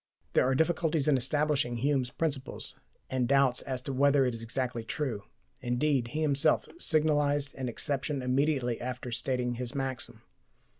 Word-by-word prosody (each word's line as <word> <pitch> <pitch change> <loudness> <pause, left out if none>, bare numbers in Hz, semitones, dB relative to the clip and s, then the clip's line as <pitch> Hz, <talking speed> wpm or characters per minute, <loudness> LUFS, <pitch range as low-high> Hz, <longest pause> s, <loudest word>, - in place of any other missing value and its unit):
There - - +4
are 135 - +2
difficulties 160 -1 +1
in 150 - +5
establishing 145 -2 0
Hume's 135 0 +1
principles, 140 -1 -3 0.4
and 130 -2 +1
doubts 135 -2 +3
as 130 -2 -4
to 135 - -4
whether 140 +1 +4
it 125 - 0
is 115 - -6
exactly 120 0 -3
true. 115 -4 -3 0.4
Indeed, 125 0 +1
he 155 +6 -2
himself 145 +1 +3
signalized 145 - +2
an 130 -2 -4
exception 140 +2 -2
immediately 130 -2 +1
after 125 0 -5
stating 125 0 -1
his 120 +1 0
maxim. 135 -2 -4
135 Hz, 150 wpm, -30 LUFS, 125-145 Hz, 0.4 s, in